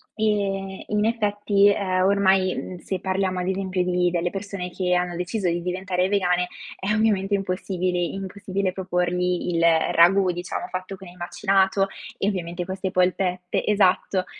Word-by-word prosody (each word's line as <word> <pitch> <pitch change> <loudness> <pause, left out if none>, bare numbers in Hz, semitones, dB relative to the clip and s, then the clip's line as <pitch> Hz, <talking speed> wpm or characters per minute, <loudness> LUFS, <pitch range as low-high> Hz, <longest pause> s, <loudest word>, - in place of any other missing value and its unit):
E 195 -3 -1
in 210 0 +1
effetti, 205 -3 +2
ehm, 185 -2 +1
ormai, 190 -1 +3
mhmm, 185 - -6
se 190 +1 -4
parliamo 190 -1 -1
ad 180 - -2
esempio 190 -1 -1
di 180 0 +1
delle 175 0 0
persone 195 -2 -5
che 180 0 -1
hanno 180 -1 0
deciso 180 +2 -2
di 170 0 -1
diventare 180 0 -1
vegane, 180 -3 +1 0.3
è 195 +2 -1
ovviamente 210 -2 +1
impossibili 185 -2 -1
impossibile 195 0 -3
proporgli 180 -1 -1
il 165 - +1 0.3
ragù, 185 +3 +5
diciamo 175 +1 -4
fatto 185 +1 -5
con 190 -1 -12
il 175 - -14
macinato, 190 +2 +1 0.3
e 195 - 0
ovviamente 175 -3 -3
queste 190 0 -3
polpette, 180 -1 0
esatto. 190 -2 +2
185 Hz, 150 wpm, -24 LUFS, 180-195 Hz, 0.3 s, ragù